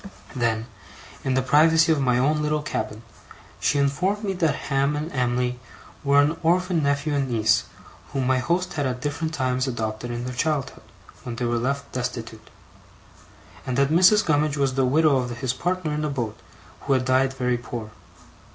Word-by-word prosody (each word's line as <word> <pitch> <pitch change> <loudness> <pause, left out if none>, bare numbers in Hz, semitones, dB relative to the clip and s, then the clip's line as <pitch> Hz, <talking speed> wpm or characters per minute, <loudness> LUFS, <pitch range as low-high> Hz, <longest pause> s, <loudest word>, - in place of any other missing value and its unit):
Then, 115 -3 0 0.6
in 130 -1 0
the 130 - +2
privacy 160 +4 +5
of 155 -3 +2
my 125 -2 +2
own 150 +4 +2
little 150 0 0
cabin, 110 -6 -4 0.6
she 145 - +1
informed 180 +10 0
me 195 -2 -1
that 165 -6 +1 0.2
Ham 140 +2 +2
and 155 +3 -4
Em'ly 125 -1 -1 0.4
were 140 0 +4
an 150 +3 +2
orphan 180 0 +2
nephew 140 +1 0
and 140 -2 0
niece, 110 -2 +2 0.5
whom 135 -2 -1
my 130 0 +2
host 175 +8 -1
had 145 -4 -1
at 125 -1 -3
different 155 +4 -3
times 130 -3 -1
adopted 110 -1 -3
in 120 0 -4
their 125 - -4
childhood, 140 0 -2 0.4
when 120 - -6
they 120 - -2
were 120 0 0
left 140 +3 -2
destitute: 115 -3 -5 1.1
and 125 -1 -3
that 140 0 +3
Mrs. 185 +6 +5
Gummidge 150 -1 +1
was 135 -2 +1
the 135 0 +2
widow 150 +2 +4
of 125 -2 -3
his 125 +1 -1
partner 175 +1 -2
in 150 +1 -2
a 150 - -1
boat, 120 -6 -3 0.5
who 140 - +2
had 130 -1 +1
died 130 +1 +3
very 125 -2 -1
poor. 120 -3 -7
135 Hz, 180 wpm, -24 LUFS, 125-155 Hz, 1.1 s, privacy